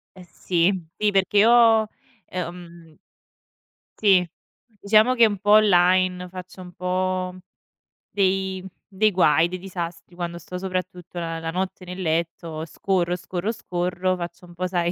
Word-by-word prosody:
Eh 185 - -12
sì 175 +2 +1 0.3
sì, 210 -1 +2
perché 195 +1 +1
io, 225 -1 +6 0.4
ehm 170 -2 -8 1.0
sì, 190 -4 +4 0.4
diciamo 215 +2 +3
che 235 -2 +6
un 205 -2 -3
po' 205 +2 0
online 185 -3 +4
faccio 185 0 -10
un 180 -1 -11
po' 185 0 -2 0.7
dei 190 -1 0 0.3
dei 215 +2 +3
guai, 170 -3 +4
dei 185 +1 -5
disastri 175 -2 -7
quando 170 -1 -4
sto 180 +2 -8
soprattutto 180 -1 -5
la 165 -1 -3
la 165 0 -4
notte 185 +1 -4
nel 180 +1 -7
letto, 165 -1 -2
scorro, 180 0 -1
scorro, 180 +4 -3
scorro, 180 -1 -2
faccio 175 +1 -7
un 175 - -15
po' 180 +1 -3
sai 175 -1 0
180 Hz, 140 wpm, -23 LUFS, 175-190 Hz, 1.0 s, io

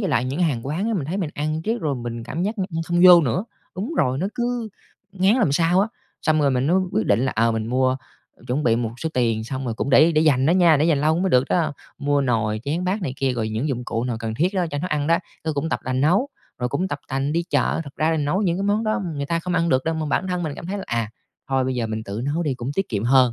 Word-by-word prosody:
với 195 - -1
lại 120 +2 +1
những 135 +7 -3
hàng 135 -7 0
quán 175 +10 -1
á 230 - 0
mình 165 -9 -1
thấy 170 +7 -3
mình 170 -7 -2
ăn 155 +2 -2
riết 225 +1 -1
rồi 150 -3 -1
mình 120 -2 -5
cảm 165 +8 -3
giác 210 +2 -2
nh - - +1
như 165 -1 -2
không 175 0 +1
vô 180 -1 +10
nữa. 150 - 0 0.3
Đúng 215 - -4
rồi, 130 +1 +1
nó 185 - 0
cứ 240 -2 -2 0.4
ngán 195 +3 +3
làm 200 - +2
sao 170 +4 +3
á, 210 - +1 0.3
xong 155 -1 +2
rồi 140 - +3
mình 130 +1 +1
mới 175 - +3 0.2
quyết 110 - 0
định 100 +2 +3
là, 130 - 0
ờ, 115 0 +3
mình 110 0 -2
mua, 130 +1 +1 0.5
chuẩn 135 +5 -1
bị 115 -1 +3
một 115 -2 -1
số 160 - 0
tiền, 115 -3 +1
xong 130 +3 -4
rồi 115 -2 -2
cũng 140 - -2
để 155 +5 +6
để 155 - +3
dành 140 -4 +3
đó - - +4
nha, 175 -3 +5
để 150 - +2
dành 155 -4 +2
lâu 155 +3 +2
mới 190 0 +1
được 125 0 +4
đó, 160 -4 +1 0.3
mua 145 0 +1
nồi 110 -5 0
chén 165 +6 -1
bát 190 +2 -1
này 130 - -2
kia, 135 -1 0
rồi 115 -3 -2
những 110 +8 -2
dụng 125 -2 -3
cụ 115 +1 -2
nào 120 -3 -2
cần 110 -1 -3
thiết 180 - 0
đó, 180 -2 +1
cho 145 - -3
nấu 180 - -3
ăn 150 -3 -1
đó. 165 +1 +3 0.2
Ư, 160 -1 -1
cũng 145 +3 -2
tập - - -1
tành 130 0 -1
nấu, 185 - +3 0.3
rồi 125 0 -1
cũng 185 +9 -1
tập 145 -4 -3
tành 135 +2 -1
đi 170 +2 +1
chợ. - - +1
Thật 140 - -11
ra 155 +1 +2
là 160 - +1
nấu 150 +7 0
những 175 -2 +1
cái 195 - -2
món 205 +2 +1
đó 215 - 0 0.2
người 140 - -3
ta 170 +3 0
không 180 +1 -3
ăn 170 0 +2
được 130 -2 +2
đâu, 160 - 0
mà 160 -1 -2
bản 180 +6 0
thân 180 -1 -1
mình 150 -3 -3
cảm 170 - -8
thấy 200 +2 -3
là, - - -6
à, 115 -2 -2 0.4
thôi 135 -1 +1
bây 130 0 -1
giờ 120 -2 -1
mình 110 0 -4
tự 100 +3 -5
nấu 155 +5 -1
đi 145 -5 -1
cũng 125 +2 -5
tiết 195 - -1
kiệm 105 -1 -2
hơn. 125 -1 +4
150 Hz, 305 wpm, -22 LUFS, 125-175 Hz, 0.5 s, vô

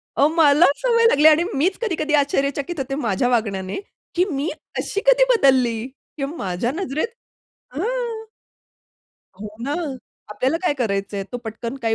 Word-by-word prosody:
अहो, 285 - +4
मला 305 0 +6
सवय 465 -2 +2
लागली 300 -6 +5
आणि 315 +2 +6
मीच 360 +8 +1
कधी-कधी 315 -8 -1
आश्चर्यचकित 285 +2 0
होते 270 0 -3
माझ्या 220 +3 +1
वागण्याने, 200 - -1 0.4
की 350 - +3
मी 285 +3 -1 0.3
अशी 405 - -2
कधी - - +6
बदलली 250 - +3
किंवा 275 +3 -8
माझ्या 190 +6 -2
नजरेत 315 - -2 0.7
हां. 325 - -2 1.5
हो 210 - -5 0.2
ना. 285 +3 -1 0.6
आपल्याला 260 +8 0
काय 325 -5 +1
करायचंय? 200 -3 -2
तो - - -2
पटकन 230 +3 -5
काही 225 -1 +1
275 Hz, 140 wpm, -21 LUFS, 230-320 Hz, 1.5 s, मला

